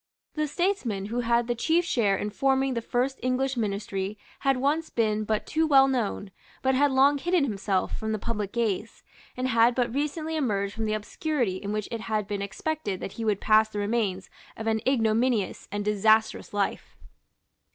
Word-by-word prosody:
The 305 -1 -1
statesman 285 - -1
who 245 - 0
had 235 0 +2
the 240 - 0
chief 325 +9 +1
share 210 - +2
in 210 +2 -3
forming 270 +2 +1
the 235 - -2
first 250 +3 -1
English 260 +1 0
Ministry 200 -2 -2 0.2
had 270 -2 +2
once 295 +5 0
been 215 -2 0
but 215 0 -1
too 320 +1 +1
well 270 -2 +6
known, 220 -6 -2 0.3
but 265 0 +3
had 285 +2 +4
long 275 +2 +4
hidden 350 +1 +2
himself 200 -6 -1
from 220 0 -3
the 215 - 0
public 210 -2 -3
gaze, 225 -2 -2 0.3
and 255 +1 -1
had 235 0 +4
but 245 -2 0
recently 305 +3 -2
emerged 205 -9 -1
from 220 +1 -3
the 215 - 0
obscurity 230 - -2
in 200 +1 -5
which 210 -1 -2
it 230 -2 -4
had 215 -2 -2
been 205 -1 -3
expected 205 0 -3
that - - -5
he 230 - -6
would 210 -3 +1
pass 220 0 +4
the 210 - -7
remains 205 -3 -1 0.3
of 220 - -5
an 220 -1 +1
ignominious 230 -4 +1
and 205 0 -3
disastrous 215 +1 +2
life. 205 -1 -2
230 Hz, 185 wpm, -27 LUFS, 210-270 Hz, 0.3 s, well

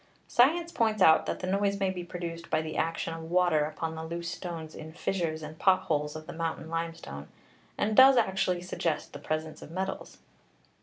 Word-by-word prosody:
Science 330 +7 +3
points 220 -5 +1
out 160 -4 +6
that - - -3
the - - -2
noise 200 +1 +1
may 195 -1 +1
be 180 -1 -5
produced 170 -1 -6
by 155 - +2
the 155 0 -4
action 165 0 -1
of 165 0 -7
water 175 -4 +3
upon 160 +1 -4
the 160 0 -6
loose 170 +1 -4
stones 165 -3 -6
in 160 0 -9
fissures 165 -2 -2
and 155 +1 -8
pot 190 -1 +4
holes 150 -1 -1
of 155 0 -7
the 175 - -8
mountain 165 -1 -3
limestone, 165 - -4 0.5
and 215 +1 0
does 265 +1 +9
actually 190 -5 +1
suggest 170 -3 -2
the 145 - -7
presence 155 +1 -3
of - - -10
metals. 190 +3 -4
170 Hz, 195 wpm, -29 LUFS, 160-190 Hz, 0.5 s, does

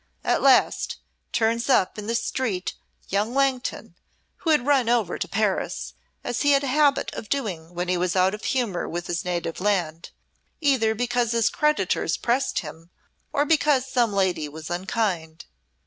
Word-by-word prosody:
At - - +1
last, 270 -2 +3 0.3
turns 230 +2 0
up 210 -5 +2
in 210 - -7
the 230 - 0
street 230 -6 -2 0.4
young 210 +5 0
Langton, 270 -2 0 0.4
who 330 - -3
had 300 -5 +3
run 270 -5 +3
over 230 -7 +1
to - - -2
Paris, 210 -2 -1 0.3
as 245 - -2
he 285 -1 +4
had 275 0 +3
a 260 -2 -1
habit 290 -2 +2
of 215 - -7
doing 180 -11 -3
when 175 +1 -2
he 180 0 +1
was 180 0 0
out 185 +1 +3
of 210 - -7
humour 235 -9 -1
with 175 +1 -4
his 175 0 -2
native 175 -1 -3
land, 175 -5 -1 0.5
either 255 -7 +2
because 240 0 0
his 230 -1 +2
creditors 300 0 +1
pressed 260 +3 0
him, 160 +1 -10 0.4
or 290 -1 +1
because 295 -4 +3
some 245 -4 +1
lady 180 -6 0
was 155 +2 -9
unkind. 175 -3 -2
220 Hz, 165 wpm, -24 LUFS, 180-260 Hz, 0.5 s, he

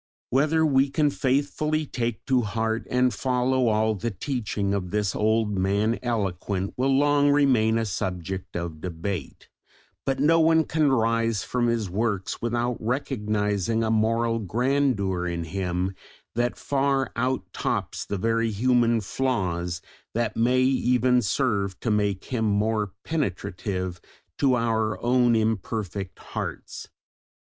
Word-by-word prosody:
Whether 155 +4 +3
we 135 -2 +3
can 145 +1 +2
faithfully 145 +4 0
take 120 -5 -3
to 130 -2 +3
heart 110 +1 -2
and 125 -1 +2
follow 130 +1 +1
all 110 0 +2
the 110 +3 -3
teaching 105 -2 -2
of 95 -3 -2
this 105 0 -1
"old 110 -1 +1
Man 100 +4 +1
eloquent" 100 -5 -2
will 130 +2 +1
long 145 0 +4
remain 130 -6 +3
a 115 - 0
subject 95 -1 -4
of 85 -3 -5
debate, 90 +2 -5 0.6
but 135 -1 -1
no 165 +4 +4
one 160 0 +5
can 150 -2 +1
rise 115 -3 +1
from 120 -1 0
his 115 -3 0
works 100 0 -2
without 120 +1 -1
recognising 110 -3 -1
a 110 - 0
moral 115 +1 +1
grandeur 110 -4 0
in 85 -1 -2
him 90 +2 -2 0.4
that 120 +1 0
far 135 -2 0
out 130 +2 -1
tops - - -2
the 100 - -3
very 115 +3 +1
human 120 +1 +2
flaws 90 -8 -2 0.3
that 115 -1 0
may 125 +3 +3
even 125 -1 +3
serve 100 -4 0
to 115 - 0
make 100 -2 0
him 115 -4 -1
more 105 0 +1
penetrative 95 - -3 0.4
to 135 -3 +4
our 110 -2 0
own 120 -1 +4
imperfect 105 -3 -2
hearts. - - -6
115 Hz, 135 wpm, -25 LUFS, 100-130 Hz, 0.6 s, one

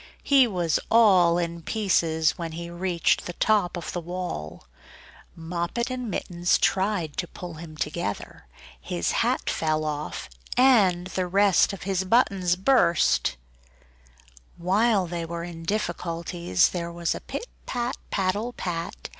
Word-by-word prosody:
He 275 -3 +5
was 175 -6 0
all 185 -7 +5
in 170 -1 -3
pieces 165 -6 +1
when 165 -2 -6
he 170 +1 -6
reached 175 -1 0
the 175 - -5
top 200 -3 +1
of 170 - -6
the 175 - -3
wall. 170 - -6 0.7
Moppet 170 +9 -3
and 250 -2 -4
Mittens 175 -2 0
tried 190 -5 0
to 175 - -2
pull 175 0 -8
him 155 -1 -10
together; 150 - -4 0.3
his 85 +5 -2
hat - - 0
fell 155 -1 0
off, 150 0 -4 0.3
and 205 -9 +5
the 185 0 -2
rest 195 +1 +4
of 195 - -7
his 190 -1 0
buttons 190 -4 +2
burst. 180 - +3 1.2
While 195 +3 +2
they 170 0 -4
were 170 0 -5
in 170 -1 -8
difficulties, 170 - 0
there 170 -1 -4
was 170 -1 -1
a - - -7
pit - - -6 0.2
pat 245 +1 -2
paddle 205 +5 -1
pat! 170 -5 -5
175 Hz, 140 wpm, -25 LUFS, 170-200 Hz, 1.2 s, He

